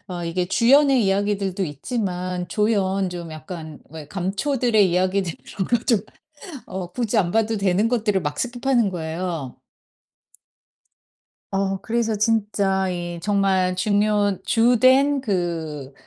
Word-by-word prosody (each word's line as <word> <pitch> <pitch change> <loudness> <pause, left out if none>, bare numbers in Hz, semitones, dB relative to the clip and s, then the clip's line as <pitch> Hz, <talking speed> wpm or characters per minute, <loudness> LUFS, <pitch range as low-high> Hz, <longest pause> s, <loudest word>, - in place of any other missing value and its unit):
어 175 -1 -5
이게 180 +2 -1
주연의 265 +4 +4
이야기들도 195 -1 0
있지만 180 - -3
조연 195 -3 +1
좀 170 -2 -7
약간 155 -1 -8
왜 155 -2 -9
감초들의 205 +2 +1
이야기들 185 0 +1 0.2
그런 190 -3 -2
거 240 - +4
좀 230 -6 +3 0.7
어 185 -2 -6
굳이 235 -2 -2
안 180 -5 +2
봐도 225 +1 +1
되는 200 +2 +2
것들을 215 -5 +1
막 150 -2 -3
스킵하는 245 -2 0
거예요. 165 -4 -4 2.0
어 195 0 0
그래서 225 0 -1
진짜 200 -3 +1
이 175 -1 -4
정말 190 -2 +1
중요 205 0 +1
주된 255 +6 +4
그 165 - -3
195 Hz, 245 characters per minute, -22 LUFS, 180-225 Hz, 2.0 s, 주연의